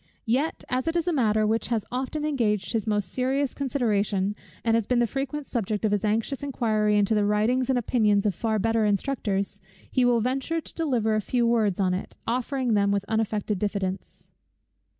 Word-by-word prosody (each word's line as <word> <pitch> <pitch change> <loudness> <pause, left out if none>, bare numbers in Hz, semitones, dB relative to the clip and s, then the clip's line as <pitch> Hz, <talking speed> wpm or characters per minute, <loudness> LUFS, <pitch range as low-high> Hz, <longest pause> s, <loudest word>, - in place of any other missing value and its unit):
Yet, 265 +8 0
as 255 +2 -1
it 325 - 0
is 340 0 0
a 350 - +2
matter 215 -6 +2
which 220 +2 0
has 230 -3 -1
often 265 +4 -2
engaged 210 - 0
his 225 -1 -1
most 205 -4 0
serious 265 +2 0
consideration, 210 -7 0 0.3
and 225 - +3
has 225 -2 +1
been 250 - +2
the 240 - +4
frequent 275 +4 -3
subject 220 -3 -2
of 215 - +2
his 205 -1 0
anxious 225 +6 0
inquiry 215 -6 +1
into 205 +1 +2
the 210 -1 +2
writings 220 +5 +1
and 260 - +3
opinions 215 -4 +2
of 205 - +2
far 220 +4 -1
better 225 +2 +1
instructors, 205 -2 -1 0.3
he 255 - +2
will 245 -1 +4
venture 265 +7 -1
to - - -11
deliver 245 -9 0
a 215 - +1
few 240 +3 0
words 220 -5 +2
on 185 -2 +2
it, 185 - -5
offering 250 0 0
them 200 -1 +3
with 200 0 0
unaffected 215 -2 -1
diffidence. 200 -2 -4
225 Hz, 190 wpm, -26 LUFS, 210-255 Hz, 0.3 s, the